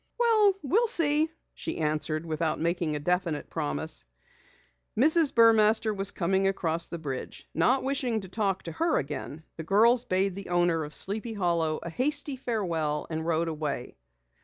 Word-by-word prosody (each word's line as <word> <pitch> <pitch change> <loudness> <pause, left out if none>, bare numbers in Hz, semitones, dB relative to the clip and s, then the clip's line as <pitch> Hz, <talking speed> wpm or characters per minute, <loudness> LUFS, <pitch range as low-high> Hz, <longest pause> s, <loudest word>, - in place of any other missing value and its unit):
"Well, 445 -4 +4
we'll 425 - +2
see," 310 -4 +2 0.2
she - - -5
answered, 155 +1 -1
without 160 0 -1
making 170 -2 -1
a - - -2
definite 175 -1 -2
promise. 75 0 -2 0.9
Mrs. 315 +4 +4
Burmaster 220 -1 +4
was 195 0 +3
coming 190 +1 0
across 170 -4 -1
the 170 - -6
bridge. 135 -5 -7
Not 245 +12 +2
wishing 260 -5 -1
to 190 - -8
talk 195 -1 -2
to 165 - -6
her, 330 - +1
the 150 +3 -8
girls 230 +8 +3
bade 190 +1 0
the 195 0 -8
owner 175 -2 +1
of 150 0 -1
Sleepy 220 +4 0
Hollow 170 -5 0
a 170 - -6
hasty 285 - 0
farewell 170 - -2
and 160 +1 -3
rode 165 0 0
away. 150 -5 -4
185 Hz, 155 wpm, -27 LUFS, 160-235 Hz, 0.9 s, Well